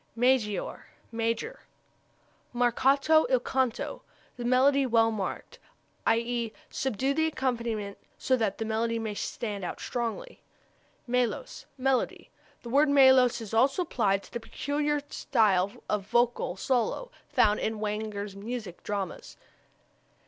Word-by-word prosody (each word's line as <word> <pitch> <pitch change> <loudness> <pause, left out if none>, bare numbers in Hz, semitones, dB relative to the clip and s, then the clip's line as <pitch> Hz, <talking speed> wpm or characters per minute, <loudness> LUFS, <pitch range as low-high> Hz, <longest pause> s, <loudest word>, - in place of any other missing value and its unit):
Maggiore 240 -3 +1 0.3
major. 230 - -2 1.0
Marcato 270 - +3
il - - +4
canto 260 -3 -1 0.3
the 245 - -6
melody 265 +3 +4
well 225 -3 +3
marked; 215 - -5 0.5
i.e., 235 0 +1 0.2
subdue 265 +2 -1
the 320 +2 +2
accompaniment 235 -8 -2 0.2
so 260 - +2
that 220 -5 -1
the 225 - -3
melody 230 +1 0
may 220 -2 -3
stand 205 -1 -4
out 175 - -4
strongly. 240 - -4 0.6
Melos 250 - -2
melody. 265 -1 0 0.3
This 235 - -7
word 290 +3 +4
melos 260 -3 +6
is 225 -1 -8
also 270 +10 +3
applied 200 - 0
to - - -16
the 235 - -2
peculiar 290 +4 -2
style 200 -6 +2 0.2
of 205 -2 -1
vocal 240 -5 +1
solo 260 - -1 0.2
found 210 0 +3
in 220 -1 -2
Wagner's 210 -1 -3
music 215 -3 -6
dramas. 200 -2 -5
235 Hz, 120 wpm, -28 LUFS, 215-265 Hz, 1.0 s, melos